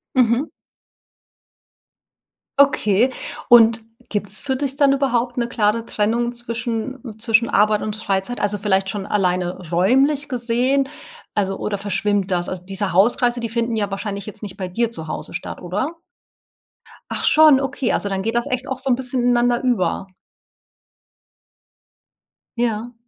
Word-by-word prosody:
Mhm. 250 +2 +3 2.1
Okay, 245 -4 +4 0.4
und 230 -1 +7 0.3
gibt's 205 0 -2
für 265 -2 -2
dich 275 0 -2
dann 280 -1 +4
überhaupt 245 -3 0
'ne 240 -1 -1
klare 225 -1 +1
Trennung 235 +3 0
zwischen 235 0 -4
zwischen 230 +1 +2
Arbeit 210 +1 +3
und 215 0 -2
Freizeit, 200 +3 -2
also 205 0 0
vielleicht 195 -1 +1
schon 200 -1 -4
alleine 180 -3 -1
räumlich 270 - +2
gesehen 250 +3 +1 0.5
also 195 -1 0
oder 205 -1 -2
verschwimmt 200 0 0
das? 175 -1 0
Also 185 -1 -5
diese 195 -1 -3
Hauskreise, 240 +5 +3
die 230 - -3
finden 230 0 -1
ja 205 -2 -1
wahrscheinlich 200 0 -4
jetzt 210 - -7
nicht 195 -3 -6
bei 185 -2 -5
dir 230 +5 0
zu 160 -9 -7
Hause - - -5
statt, - - -6
oder? 210 - -3 1.2
Ach - - -2
schon, 305 -3 +6
okay, 270 -2 -1
also 200 - 0
dann 195 -1 -2
geht 225 - -1
das 235 +3 0
echt 255 +1 -2
auch 265 -1 -3
so 270 - -1
'n 250 - +4
bisschen 255 0 -2
ineinander 240 0 +2
über. 195 -6 0 2.5
Ja. 235 0 -1
230 Hz, 145 wpm, -21 LUFS, 200-245 Hz, 2.5 s, und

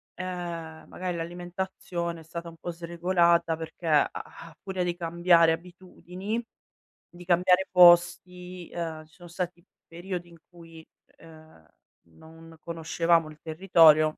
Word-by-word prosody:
Ehm, 170 -3 -6
magari 180 -2 -5
l'alimentazione 175 0 -5
è - - -14
stata 170 +1 -8
un 165 - -10
po' 175 - -6
sregolata 170 -1 +1
perché, 160 +1 -9
a 150 -2 +4
a 165 -1 -10
furia 190 -2 -3
di 175 -1 -2
cambiare 170 -1 +3
abitudini, 185 +4 -6 0.7
di 175 0 -13
cambiare 180 +2 +3
posti, 180 0 +4
uhm, 160 -2 -5
ci 155 - -28
son 175 -1 -14
stati 175 0 -5 0.2
periodi 175 +1 -6
in 170 - -16
cui, 165 -2 -14 0.3
uhm, 155 - -17 0.4
non 165 - -16
conoscevamo 165 0 0
il 155 - -14
territorio 160 -2 +5
170 Hz, 125 wpm, -27 LUFS, 165-180 Hz, 0.7 s, territorio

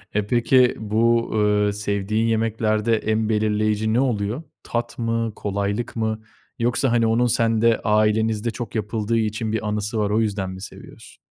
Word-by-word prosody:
Eee, 105 -1 0
peki 125 +2 +3
bu, 115 +2 +1
eee, 105 -1 +2
sevdiğin 105 +2 -1
yemeklerde 110 0 +1
en 110 0 -1
belirleyici 110 0 +1
ne 120 - +3
oluyor? 120 +1 -1 0.2
Tat 120 0 -3
mı, 115 -1 -1
kolaylık 100 +3 -3
mı 110 -1 -2 0.4
yoksa 120 +2 +1
hani 115 -1 +3
onun 115 +2 +2
sende, 115 0 +2
ailenizde 110 +1 +1
çok 115 +1 -7
yapıldığı 110 +1 -1
için 110 0 -1
bir 110 -1 -2
anısı 105 +1 -2
var, 105 -1 +1
o 110 +2 +2
yüzden 100 -3 -2
mi 95 0 -8
seviyorsun? - - -12
110 Hz, 155 wpm, -22 LUFS, 105-115 Hz, 0.4 s, peki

